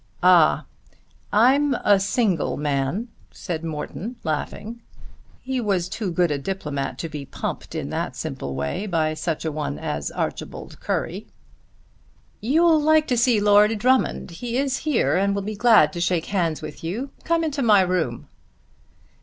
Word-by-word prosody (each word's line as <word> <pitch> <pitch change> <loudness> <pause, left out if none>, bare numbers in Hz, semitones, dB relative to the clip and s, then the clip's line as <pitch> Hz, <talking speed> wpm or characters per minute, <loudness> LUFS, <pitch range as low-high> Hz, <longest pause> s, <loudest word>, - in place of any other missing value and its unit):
"Ah; 180 -4 +5 0.7
I'm 265 +5 +4
a 205 -4 +3
single 195 - 0
man," 145 - -1 0.2
said 165 -4 -5
Morton 165 +9 -5
laughing. 210 +9 -4 0.6
He 260 -1 -2
was 195 -5 0
too 200 +1 -3
good 170 -1 +2
a 145 - -1
diplomate 145 -4 -4
to 165 - -4
be 150 -3 -6
pumped - - -5
in - - -4
that - - -3
simple 70 0 -5
way 70 - -3
by 160 -4 0
such 160 0 -3
a 160 - -1
one 145 - -3
as 75 -1 -3
Archibald - - -5
Currie. - - -3 1.1
"You'll 315 +7 +3
like 310 +1 +4
to 250 - +2
see 235 -2 +3
Lord 210 +1 +5
Drummond. 255 -3 +1
He 235 +8 -4
is 270 -1 0
here 300 -6 +1
and 200 +1 +1
will 200 - -2
be 215 +2 -4
glad 200 -9 +5
to 170 - -4
shake 170 -1 +1
hands 170 -5 0
with - - -8
you. 225 +12 -4
Come 335 0 +1
into 300 -3 -2
my 210 -5 +5
room." 180 -10 -1
195 Hz, 155 wpm, -23 LUFS, 160-240 Hz, 1.1 s, Ah